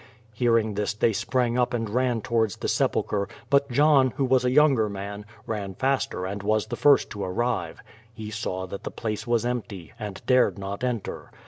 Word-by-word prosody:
'' 115 Hz, 0 st, -31 dB
Hearing 115 Hz, -2 st, +2 dB
this 105 Hz, 0 st, -2 dB
they 110 Hz, +1 st, +2 dB
sprang 125 Hz, +3 st, 0 dB
up 125 Hz, 0 st, +1 dB
and 115 Hz, -1 st, -2 dB
ran 120 Hz, +1 st, 0 dB
towards 110 Hz, -2 st, 0 dB
the -, -, -3 dB
sepulchre, 100 Hz, -1 st, 0 dB, 0.2 s
])ut 140 Hz, 0 st, +4 dB
.lohn, 135 Hz, -1 st, +4 dB
who 135 Hz, -, +1 dB
was 130 Hz, -1 st, +3 dB
a 125 Hz, -, +2 dB
younger 135 Hz, -5 st, +4 dB
man, 100 Hz, +1 st, -6 dB, 0.2 s
ran 100 Hz, -4 st, -4 dB
faster 130 Hz, -7 st, -1 dB
and 100 Hz, +2 st, -4 dB
was 105 Hz, +1 st, +1 dB
the 110 Hz, -, -5 dB
first 145 Hz, -1 st, +4 dB
to 100 Hz, -2 st, -5 dB
arrive. 120 Hz, +7 st, -2 dB, 0.3 s
He 110 Hz, -1 st, -8 dB
saw 95 Hz, -4 st, -3 dB
that 95 Hz, +1 st, -8 dB
the -, -, -4 dB
place 110 Hz, +1 st, -4 dB
was 120 Hz, -1 st, +1 dB
empty, 115 Hz, -8 st, -4 dB
and 105 Hz, -3 st, -6 dB
dared 125 Hz, -3 st, +3 dB
not 100 Hz, +3 st, -5 dB
enter. 120 Hz, -5 st, -3 dB
115 Hz, 195 wpm, -25 LUFS, 100-125 Hz, 0.3 s, ut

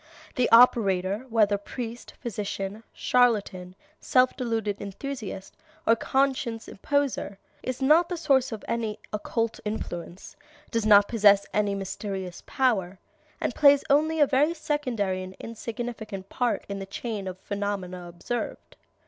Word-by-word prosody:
The 250 Hz, -3 st, +1 dB
operator, 210 Hz, -2 st, +4 dB
whether 210 Hz, -3 st, +3 dB
priest, 235 Hz, +2 st, -7 dB
physician, 205 Hz, -2 st, -4 dB
charlatan, 205 Hz, -7 st, +1 dB, 0.2 s
self 255 Hz, 0 st, +3 dB
deluded 225 Hz, -4 st, -2 dB
enthusiast, 205 Hz, -1 st, -6 dB, 0.3 s
or 230 Hz, -, +5 dB
conscious 260 Hz, -2 st, 0 dB
imposter, 275 Hz, -4 st, -1 dB, 0.2 s
is 255 Hz, +1 st, -4 dB
not 320 Hz, +5 st, +5 dB
the 355 Hz, -, -2 dB
source 270 Hz, -6 st, +2 dB
of 220 Hz, -2 st, -6 dB
any 225 Hz, -2 st, -2 dB, 0.2 s
occult 225 Hz, +2 st, -2 dB
influence, 180 Hz, -4 st, -6 dB, 0.4 s
does 230 Hz, -2 st, 0 dB
not 205 Hz, -1 st, +7 dB
possess 205 Hz, -3 st, +5 dB
any 205 Hz, -1 st, +1 dB
mysterious 195 Hz, -2 st, -5 dB
power, 200 Hz, -8 st, +1 dB, 0.4 s
and -, -, -1 dB
plays 285 Hz, -1 st, +6 dB
only 315 Hz, +3 st, +3 dB
a 295 Hz, -, +7 dB
very 290 Hz, +5 st, +2 dB
secondary 245 Hz, -, -1 dB
and 185 Hz, 0 st, -8 dB
insignificant 225 Hz, -4 st, -6 dB
part 245 Hz, -2 st, -1 dB
in 200 Hz, 0 st, -4 dB
the 195 Hz, -, -6 dB
chain 205 Hz, -1 st, -5 dB
of 185 Hz, 0 st, -5 dB
phenomena 195 Hz, -3 st, -4 dB
observed. 175 Hz, +8 st, -5 dB
220 Hz, 130 wpm, -26 LUFS, 195-255 Hz, 0.4 s, not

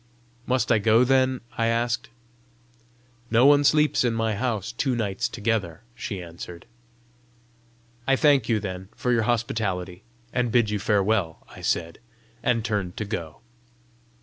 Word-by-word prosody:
"Must 130 Hz, 0 st, +1 dB
I 110 Hz, -, +4 dB
go, 110 Hz, +3 st, +4 dB
then?" 130 Hz, 0 st, +2 dB, 0.2 s
I 115 Hz, -, +2 dB
asked. 115 Hz, +1 st, 0 dB, 1.2 s
"No 120 Hz, +3 st, +4 dB
one 145 Hz, 0 st, +6 dB
sleeps 150 Hz, 0 st, +3 dB
in 120 Hz, -2 st, +1 dB
my 115 Hz, -1 st, 0 dB
house 110 Hz, -2 st, -2 dB
two 125 Hz, +2 st, -1 dB
nights 100 Hz, -5 st, -1 dB
together!" 105 Hz, -5 st, -2 dB
she 100 Hz, -5 st, -5 dB
answered. 85 Hz, 0 st, -10 dB, 1.4 s
"I 135 Hz, -, +4 dB
thank 140 Hz, -5 st, +3 dB
you, 110 Hz, -2 st, +2 dB
then, 95 Hz, -2 st, -6 dB
for 125 Hz, -, -1 dB
your 115 Hz, -2 st, +3 dB
hospitality, 95 Hz, -6 st, -2 dB, 0.3 s
and 125 Hz, -2 st, 0 dB
bid 115 Hz, -3 st, +3 dB
you 105 Hz, -, -1 dB
farewell!" 100 Hz, -4 st, 0 dB
I -, -, -12 dB
said, 85 Hz, -1 st, -1 dB, 0.4 s
and 115 Hz, -2 st, +1 dB
turned 100 Hz, -6 st, -2 dB
to 105 Hz, -, -3 dB
go. 85 Hz, -7 st, -6 dB
110 Hz, 145 wpm, -25 LUFS, 95-120 Hz, 1.4 s, one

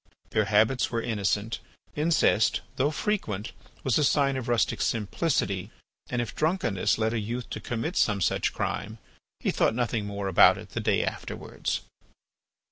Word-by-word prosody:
Their 110 Hz, -, +2 dB
habits 110 Hz, +5 st, +3 dB
were 115 Hz, -, -1 dB
innocent. 105 Hz, 0 st, -1 dB, 0.4 s
Incest, 150 Hz, -8 st, +3 dB
though 135 Hz, +3 st, +2 dB
frequent, 145 Hz, -, -2 dB, 0.3 s
was 130 Hz, -1 st, +2 dB
a -, -, +3 dB
sign 140 Hz, -1 st, +3 dB
of 130 Hz, -2 st, -4 dB
rustic 120 Hz, -1 st, +1 dB
simplicity 105 Hz, -, 0 dB, 0.4 s
and 120 Hz, -1 st, 0 dB
if 115 Hz, -, -7 dB
drunkenness 155 Hz, -, +1 dB
led 110 Hz, 0 st, 0 dB
a 115 Hz, -, 0 dB
youth 115 Hz, +3 st, -4 dB
to -, -, -3 dB
commit 120 Hz, +10 st, -3 dB
some 105 Hz, -2 st, +2 dB
such 90 Hz, -, +1 dB
crime 110 Hz, +2 st, -3 dB, 0.4 s
he -, -, +1 dB
thought -, -, +2 dB
nothing 115 Hz, -3 st, -1 dB
more 100 Hz, -1 st, -3 dB
about 95 Hz, -, +6 dB
it -, -, -10 dB
the -, -, -4 dB
day -, -, +2 dB
afterwards. -, -, -4 dB
115 Hz, 155 wpm, -27 LUFS, 105-130 Hz, 0.4 s, about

